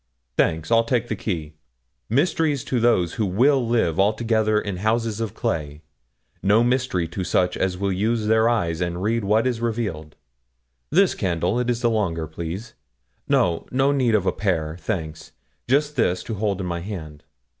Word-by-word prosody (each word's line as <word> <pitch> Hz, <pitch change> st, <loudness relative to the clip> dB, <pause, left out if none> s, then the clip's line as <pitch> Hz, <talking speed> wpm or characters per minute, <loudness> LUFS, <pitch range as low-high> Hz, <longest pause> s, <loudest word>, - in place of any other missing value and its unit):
Thanks, 80 Hz, -, 0 dB
I'll 115 Hz, 0 st, +5 dB
take 120 Hz, 0 st, -1 dB
the -, -, -1 dB
key. 80 Hz, -7 st, -4 dB, 0.6 s
Mysteries 145 Hz, -, +1 dB
to 125 Hz, -, -1 dB
those 105 Hz, -8 st, +2 dB
who 110 Hz, -, -1 dB
will 130 Hz, +8 st, +3 dB
live 110 Hz, -9 st, +1 dB
altogether 110 Hz, +1 st, +2 dB
in 100 Hz, -3 st, -4 dB
houses 110 Hz, +2 st, 0 dB
of 115 Hz, -3 st, -3 dB
clay, 75 Hz, 0 st, -3 dB, 0.6 s
no 105 Hz, +5 st, +4 dB
mystery 125 Hz, -8 st, 0 dB
to 95 Hz, +3 st, -4 dB
such 90 Hz, 0 st, +1 dB
as 95 Hz, -1 st, -1 dB
will 100 Hz, +1 st, -1 dB
use 110 Hz, +4 st, 0 dB
their 110 Hz, +1 st, +4 dB
eyes 85 Hz, -8 st, 0 dB
and 85 Hz, +1 st, -2 dB
read 115 Hz, +1 st, 0 dB
what 105 Hz, +4 st, +2 dB
is 120 Hz, -3 st, -1 dB
revealed. 105 Hz, -11 st, -3 dB, 0.7 s
This 190 Hz, +2 st, +4 dB
candle, 90 Hz, +3 st, -1 dB
it 125 Hz, 0 st, -1 dB
is 120 Hz, -1 st, 0 dB
the 120 Hz, -, +3 dB
longer, 85 Hz, -7 st, -1 dB
please; 85 Hz, +8 st, -6 dB, 0.6 s
no 85 Hz, -2 st, +2 dB
no 135 Hz, +2 st, +2 dB
need 125 Hz, -5 st, +2 dB
of 100 Hz, -3 st, +1 dB
a -, -, +3 dB
pair, 80 Hz, -6 st, -1 dB
thanks; 80 Hz, -7 st, -5 dB, 0.4 s
just 145 Hz, +3 st, +2 dB
this, 90 Hz, -8 st, +1 dB
to 115 Hz, -, -5 dB
hold 100 Hz, -2 st, -1 dB
in -, -, -3 dB
my 85 Hz, -1 st, -2 dB
hand. 85 Hz, -6 st, -7 dB
105 Hz, 175 wpm, -23 LUFS, 85-115 Hz, 0.7 s, I'll